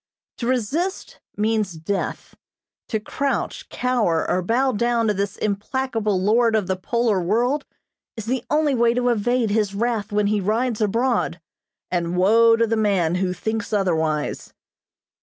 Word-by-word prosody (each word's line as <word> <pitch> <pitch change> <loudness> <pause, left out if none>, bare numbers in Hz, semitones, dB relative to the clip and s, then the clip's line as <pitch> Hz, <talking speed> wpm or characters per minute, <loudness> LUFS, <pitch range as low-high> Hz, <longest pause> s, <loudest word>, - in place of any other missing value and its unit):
To 235 - -2
resist 275 - -2 0.2
means 215 -3 0
death. 165 +5 -4 0.5
To 220 - -1
crouch, 275 +6 -3
cower 230 -10 0
or 185 - +1
bow 245 +8 +1
down 235 +1 +1
to 210 - +2
this 200 0 -3
implacable 215 0 -1
lord 225 +4 +3
of 210 -3 +1
the 190 +1 -1
polar 220 +1 0
world 240 +10 0 0.5
is 225 - -5
the 245 +1 -1
only 300 -1 +2
way 235 -1 +3
to 245 0 +1
evade 240 0 +1
his 205 -2 0
wrath 225 -1 -1
when 210 0 +1
he 205 0 +1
rides 225 +3 0
abroad, 225 -4 0 0.5
and 175 0 -1
woe 225 +5 +5
to 230 0 +2
the 225 0 0
man 195 -6 +1
who 185 -1 0
thinks 220 +4 -3
otherwise. 160 -7 -1
220 Hz, 150 wpm, -22 LUFS, 200-240 Hz, 0.5 s, woe